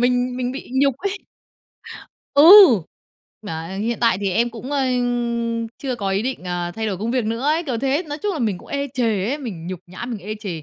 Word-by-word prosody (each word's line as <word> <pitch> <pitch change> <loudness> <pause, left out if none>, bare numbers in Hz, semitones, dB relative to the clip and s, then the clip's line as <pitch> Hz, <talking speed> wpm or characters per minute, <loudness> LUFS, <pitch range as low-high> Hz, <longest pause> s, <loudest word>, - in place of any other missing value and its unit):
mình 250 0 +1
mình 250 0 -2
bị 270 - -8
nhục 275 -1 +3
ấy. 400 +3 -3 1.2
Ừ. 285 - +6 1.0
"Mà, 165 -4 -6
ơ, 190 - -6
hiện 225 +3 -2
tại 230 -5 +3
thì 195 -1 0
em 235 +6 +1
cũng, 240 +4 -7
ơ, 285 - +1 1.0
chưa 260 -3 -3
có 200 -3 -2
ý 195 +2 0
định, 255 -6 -4
ờ, 175 -1 -3
thay 220 0 -3
đổi 195 -4 -2
công 225 +3 -2
việc 250 -3 0
nữa 230 +2 -2
ấy" 310 +4 +1
kiểu 250 -6 -2
thế, 275 +6 0
nói 295 +1 -4
chung 415 -1 0
là 320 - -4
mình 210 -7 -1
cũng - - -16
ê 280 0 -2
chề 220 -6 0
ấy, 280 +5 -2
mình 190 - -7
nhục 185 -2 -5
nhã 180 +6 -8
mình 235 -4 -4
ê 210 +3 -6
chề, 175 -7 -5
235 Hz, 230 wpm, -21 LUFS, 195-265 Hz, 1.2 s, Ừ